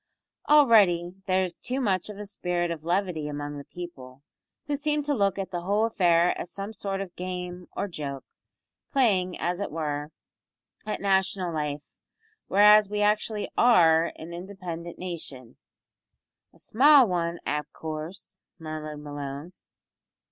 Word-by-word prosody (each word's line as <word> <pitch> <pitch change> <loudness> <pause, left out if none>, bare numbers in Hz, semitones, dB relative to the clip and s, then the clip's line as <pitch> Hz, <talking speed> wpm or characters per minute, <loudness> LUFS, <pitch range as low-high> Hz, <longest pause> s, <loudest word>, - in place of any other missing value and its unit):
Already 205 - +5
there 190 0 +3
is 180 -2 -5
too 255 +2 -3
much 200 -6 0
of 210 - -8
a 210 - -6
spirit 175 -3 -2
of 160 -2 -5
levity 175 -3 -1
among 145 0 -5
the - - -8
people, 135 -7 -10 0.4
who 290 - -1
seem 295 +1 0
to 290 0 0
look 200 -6 +1
at 195 -1 -4
the 175 -2 -3
whole 205 +5 +1
affair 175 -6 +3
as 175 - -8
a 200 +2 -5
sort 195 -1 -3
of 185 -3 -7
game 180 -1 -5
or - - -1
joke, 140 -7 -6 0.7
playing, 195 - +2
as 175 +1 -1
it 200 - -2
were, 150 -1 -3 0.8
at 215 - -3
national 190 -2 +1
life, 150 -1 -4 0.6
whereas 210 +1 +6
we 210 0 -1
actually 210 0 +1
are 170 -8 +5
an 165 +2 -9
independent 175 -2 -7
nation 155 -9 -7 0.5
" - - -59
"A - - -20
small 275 +2 +6
wan, 170 -2 -1
av 150 0 -2
coorse," 160 +4 -7 0.2
murmured 155 -2 -6
Malone. 145 +3 -6
180 Hz, 150 wpm, -27 LUFS, 160-205 Hz, 0.8 s, whereas